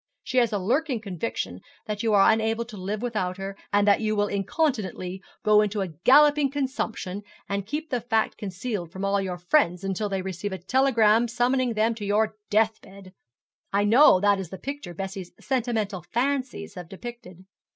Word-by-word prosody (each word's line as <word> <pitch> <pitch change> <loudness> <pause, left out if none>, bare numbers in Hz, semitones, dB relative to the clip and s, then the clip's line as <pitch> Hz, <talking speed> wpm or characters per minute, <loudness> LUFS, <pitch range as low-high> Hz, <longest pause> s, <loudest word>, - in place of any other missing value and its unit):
She 255 - +1
has 235 -3 +2
a 210 - 0
lurking 255 - 0
conviction 190 - -4 0.3
that 210 -1 -3
you 225 - +1
are 195 +1 +6
unable 225 +1 0
to 230 -2 -11
live 205 +3 -4
without 205 -6 -2
her, 195 0 -5 0.2
that 205 +1 +4
you 215 -1 0
will 205 0 +2
incontinently 200 - -2 0.2
go 210 -1 +5
into 210 -1 -1
a 190 - -2
galloping 280 - +5
consumption, 260 -8 -3 0.3
and 200 -1 -3
keep 305 +5 -4
the 250 -2 0
fact 225 -1 0
concealed 195 -3 -5
from 190 +2 -4
all 200 0 +1
your 185 -2 -3
friends 180 - +2
until 195 +2 -2
they 195 -1 -2
receive 190 +1 -4
a - - -3
telegram 230 +1 +3
summoning 245 0 +1
them 220 +2 +2
to 225 -2 -8
your 210 +2 +1 0.2
death 220 +1 +2
bed. 190 -1 -14 0.6
I 200 +1 +2
know 225 -1 +6
that 200 0 +3
is 185 -4 -5
the 190 - -7
picture 275 -11 -6
Bessie's 190 -1 -6
sentimental 225 -7 -1
fancies 250 - -2
have 175 -2 -9
depicted.' 195 -4 -10
210 Hz, 180 wpm, -25 LUFS, 190-240 Hz, 0.6 s, are